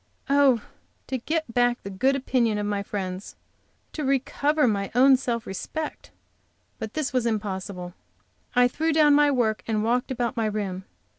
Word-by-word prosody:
Oh, 275 -5 +4 0.4
to 260 - -3
get 315 -1 -2
back 245 0 +2
the 200 - -6
good 260 +8 +2
opinion 245 -5 +1
of 205 - -2
my 205 -1 -1
friends! 190 -1 -5 0.6
To 305 - -4
recover 280 +2 +1
my 200 -3 0
own 265 +2 +7
self 240 -3 -2
respect! 300 - -5 0.7
But 220 -1 -6
this 305 -4 -2
was 250 -2 +1
impossible. 190 -4 -4 0.6
I 245 0 +6
threw 320 +6 -1
down 300 -1 +5
my 295 0 +5
work 235 -6 +1
and 215 -2 0
walked 245 +2 0
about 245 -1 -2
my 225 -2 0
room. 195 -3 -3
240 Hz, 160 wpm, -25 LUFS, 210-275 Hz, 0.7 s, own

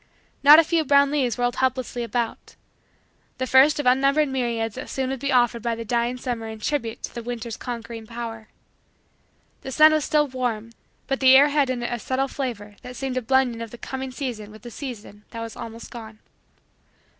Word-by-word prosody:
Not 295 +2 +9
a 330 - +7
few 325 0 +1
brown 280 -1 +4
leaves 260 -6 0
whirled 245 0 0
helplessly 255 -1 -1
about 235 -1 -3 0.8
the 260 - -1
first 270 +4 +5
of 290 - -2
unnumbered 275 +4 +3
myriads 235 -4 -2
that 260 - -8
soon 265 -1 -2
would 270 - -4
be 280 +2 -2
offered 240 -2 +2
by 235 0 -1
the 230 0 -7
dying 240 +2 0
summer 240 -3 -4
in 220 0 -7
tribute 230 -2 -3
to 235 - -5
winter's 235 -1 -5
conquering 230 -2 -7
power. 230 -2 -7 1.1
The 265 - -7
sun 310 +3 +6
was 310 -1 +1
still 300 0 +2
warm 240 -4 -3 0.3
but 270 - -2
the 260 -1 +7
air 285 +2 +7
had 285 -2 +2
in 245 -2 -2
it 240 - -2
a 240 - -3
subtle 260 +4 -1
flavor 220 -7 -5
that 250 0 -9
seemed 265 0 -3
a - - 0
blending 250 -1 +1
of 230 - -6
the 240 - -11
coming 265 +2 -5
season 250 -6 -5
with 215 +2 -14
the 240 - -9
season 220 -6 -8
that 230 - -7
was 230 -1 -7
almost 230 -1 -9
gone. 220 -2 -9
245 Hz, 200 wpm, -24 LUFS, 230-270 Hz, 1.1 s, Not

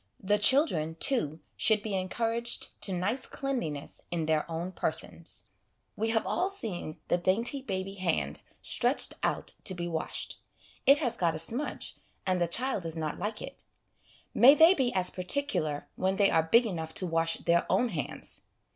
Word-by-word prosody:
The 205 +2 +1
children, 205 - +3
too, 165 - 0
should 215 -2 +3
be 215 - -4
encour 200 +5 -1
aged 235 +1 -2
to 195 - -3
nice 200 +9 0
cleanliness 170 - -4
in 165 -2 -2
their 155 +1 0
own 170 +3 -3
persons. 160 - -3 0.5
We 225 +2 -1
have 225 0 +2
all 370 - 0
seen 210 - -3
the 175 - +2
dainty 230 +10 +1
baby 195 -6 -4
hand 75 - -1 0.2
stretched - - +2
out - - -1
to 185 - -1
be 175 -1 -3
washed; 160 -2 -2 0.5
it 275 +2 +8
has 260 -6 0
got 170 -2 +1
a - - -2
smudge, 230 - -2 0.3
and 185 -1 +1
the 175 - +3
child 245 +5 0
does 165 -1 -1
not 155 -1 -3
like 215 +1 -3
it. - - -8 0.7
May 270 +4 +8
they 325 +4 +8
be 265 -8 +1
as 180 -1 +2
particular 180 - -1
when 190 +1 0
they 200 0 +3
are 160 - +4
big 235 +1 +6
enough 160 -6 -4
to 185 - +4
wash 165 -1 +2
their 170 0 +1
own 250 - +3
hands! 160 -9 -3
185 Hz, 175 wpm, -29 LUFS, 165-235 Hz, 0.7 s, it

